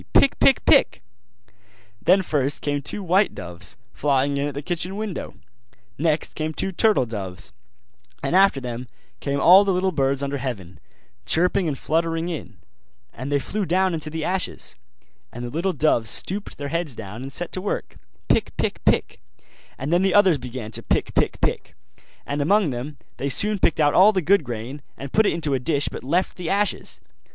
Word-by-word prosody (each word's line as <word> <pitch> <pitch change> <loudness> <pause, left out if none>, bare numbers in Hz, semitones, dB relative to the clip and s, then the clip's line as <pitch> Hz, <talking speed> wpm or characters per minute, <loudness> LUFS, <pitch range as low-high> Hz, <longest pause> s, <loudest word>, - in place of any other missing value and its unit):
pick, - - +4
pick, - - +4
pick!' - - +4 1.0
Then 190 +2 +4
first 145 -4 0
came 145 -1 -1
two 200 +8 -4
white 185 +2 +2
doves, 90 0 -4 0.2
flying 140 0 +1
in 140 +1 0
at 145 - -6
the 145 - -5
kitchen 180 +3 -3
window; 210 -3 -5 0.6
next 155 0 0
came 155 0 -4
two 195 - -1
turtle 205 - +3
doves; 100 -5 -6 0.7
and - - 0
after 195 -6 +5
them 125 -1 -6 0.3
came 140 0 -2
all 185 +7 +8
the 200 - +1
little 185 +1 +1
birds 140 -3 0
under 140 0 -2
heaven, 105 -9 -6 0.5
chirping 180 +2 +2
and 145 -3 -2
fluttering 165 +2 -1
in: 165 -4 -6 0.6
and 130 +4 -6
they 145 - +3
flew 205 +10 -3
down 185 +1 +1
into 155 -1 -4
the 160 0 -4
ashes. 190 +1 -3 0.6
And 120 - -6
the 120 - -6
little 170 +6 0
doves 145 -9 +2
stooped 200 - +1
their 145 0 -5
heads 165 -5 -2
down 105 +2 -8
and 135 +1 -7
set 175 +5 -2
to 185 - -4
work, 200 - -4 0.3
pick, - - +1
pick, - - -2
pick; - - +1 0.6
and 140 +5 -2
then 175 - +4
the 195 0 +2
others 190 -7 +5
began 120 -3 -7
to - - -3
pick, - - -1
pick, - - 0
pick: - - -2 0.5
and 145 +1 -2
among 195 +1 +3
them 130 +4 -6
all - - -32
they 140 - -2
soon 205 +9 +2
picked 165 - +2
out 145 -1 +4
all 195 +4 +7
the 185 -3 0
good 195 +2 +4
grain, 120 +3 -6 0.2
and 140 0 -8
put 220 -1 +4
it - - +3
into 155 -4 -1
a 135 - +1
dish 145 +2 0
but - - -8
left 170 +8 0
the 175 -3 -4
ashes. 200 0 -1
155 Hz, 190 wpm, -23 LUFS, 135-185 Hz, 1.0 s, all